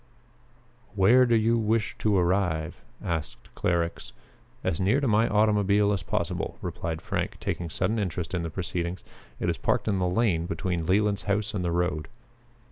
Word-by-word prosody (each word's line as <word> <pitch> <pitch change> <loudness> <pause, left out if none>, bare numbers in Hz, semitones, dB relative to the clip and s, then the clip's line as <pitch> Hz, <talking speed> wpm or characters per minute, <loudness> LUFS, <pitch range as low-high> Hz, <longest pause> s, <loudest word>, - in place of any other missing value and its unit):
"Where 120 +6 +6
do 120 - +4
you 115 +1 +3
wish 110 -1 0
to 105 -2 +2
arrive?" 90 -3 0 0.2
asked 80 -3 -4
Clarux. 85 -1 -1 0.5
"As 80 - -1
near 105 +9 +3
to 140 - 0
my 110 +1 +3
automobile 105 -1 +3
as 95 - -1
possible," 85 0 -2
replied 80 -1 -4
Frank, - - -3
taking 85 -1 -3
sudden 95 +8 0
interest 90 -4 -3
in 90 - 0
the 85 - -3
proceedings. 85 +1 -3 0.4
"It - - -1
is - - 0
parked - - 0
in 100 -3 +1
the 90 -1 +1
lane 90 -5 +1
between 85 -3 -2
Leland's 100 +2 +2
house 105 +1 0
and 95 -3 -2
the 85 - 0
road." 85 -3 -1
95 Hz, 165 wpm, -27 LUFS, 85-105 Hz, 0.5 s, Where